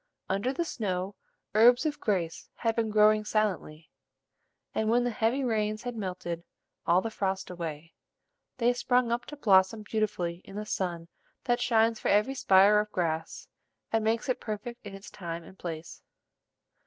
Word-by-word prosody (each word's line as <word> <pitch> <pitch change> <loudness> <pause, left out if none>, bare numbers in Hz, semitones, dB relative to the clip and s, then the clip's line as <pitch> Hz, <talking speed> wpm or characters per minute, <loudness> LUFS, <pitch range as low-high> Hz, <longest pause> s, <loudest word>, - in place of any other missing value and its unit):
Under 200 +7 0
the 335 +5 -2
snow, 195 - -3 0.4
herbs 240 +6 +6
of 300 -1 -1
grace 180 -6 -2
had 225 -1 0
been 225 -1 0
growing 215 0 +5
silently; 190 -8 -2 0.8
and, 220 0 0
when 240 +2 +3
the 245 - 0
heavy 230 +5 0
rains 215 -3 -1
had 245 -1 -4
melted 180 -4 -4 0.4
all 175 +2 +5
the 225 - -4
frost 190 -2 -2
away, 165 -2 -6 0.6
they 240 0 +3
sprung 245 -1 +1
up 235 +1 -1
to 295 - -8
blossom 200 -2 +4
beautifully 185 -6 -2
in 195 - -12
the 210 +1 -4
sun 175 -5 -3 0.4
that 240 0 +1
shines 225 -1 +3
for - - -3
every 210 +6 +3
spire 200 -4 +5
of 210 0 -2
grass, 160 -2 -2 0.4
and 225 -1 +1
makes 225 +1 0
it 255 - -1
perfect 235 +3 -6
in 200 -2 -8
its 195 - -11
time 170 -3 -6
and 190 - -15
place. 165 -2 -7
210 Hz, 165 wpm, -29 LUFS, 185-230 Hz, 0.8 s, herbs